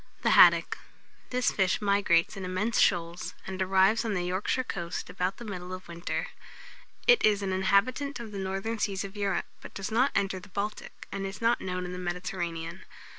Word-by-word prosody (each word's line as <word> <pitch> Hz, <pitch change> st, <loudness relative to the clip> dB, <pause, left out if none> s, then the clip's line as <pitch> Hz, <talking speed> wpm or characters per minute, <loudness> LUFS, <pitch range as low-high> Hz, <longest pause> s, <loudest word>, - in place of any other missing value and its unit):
[Illustration: -, -, -32 dB
THE -, -, +3 dB
HADDOCK.] -, -, +7 dB
THE -, -, -3 dB
HADDOCK. -, -, -26 dB
This 250 Hz, 0 st, +1 dB
fish 190 Hz, -2 st, +1 dB
migrates 200 Hz, -5 st, +2 dB
in 195 Hz, -, -6 dB
immense 185 Hz, +5 st, 0 dB
shoals, 170 Hz, +1 st, +1 dB
and 190 Hz, 0 st, -5 dB
arrives 190 Hz, +4 st, +4 dB
on 220 Hz, -3 st, -1 dB
the 180 Hz, -, -1 dB
Yorkshire 185 Hz, +8 st, 0 dB
coast 170 Hz, -8 st, -5 dB
about 185 Hz, +1 st, -2 dB
the 240 Hz, -, -9 dB
middle 180 Hz, -3 st, -6 dB
of 185 Hz, 0 st, -8 dB
winter. 170 Hz, 0 st, -4 dB, 0.8 s
It 485 Hz, -1 st, +6 dB
is 205 Hz, -1 st, +3 dB
an 190 Hz, -1 st, -1 dB
inhabitant 230 Hz, +9 st, +1 dB
of 230 Hz, -2 st, -7 dB
the 200 Hz, -, -5 dB
northern 195 Hz, +4 st, -3 dB
seas 195 Hz, -2 st, -1 dB
of 200 Hz, +1 st, -8 dB
Europe, 200 Hz, -1 st, -1 dB, 0.2 s
but -, -, -11 dB
does 195 Hz, +2 st, -4 dB
not 250 Hz, +5 st, +3 dB
enter 195 Hz, -1 st, 0 dB
the 185 Hz, -, -14 dB
Baltic, 205 Hz, +2 st, -5 dB
and 195 Hz, 0 st, -3 dB
is 195 Hz, 0 st, -7 dB
not 230 Hz, +1 st, +2 dB
known 180 Hz, -1 st, -3 dB
in 180 Hz, -, -5 dB
the 180 Hz, -, -5 dB
Mediterranean. 175 Hz, -1 st, -4 dB
195 Hz, 205 wpm, -29 LUFS, 180-210 Hz, 0.8 s, HADDOCK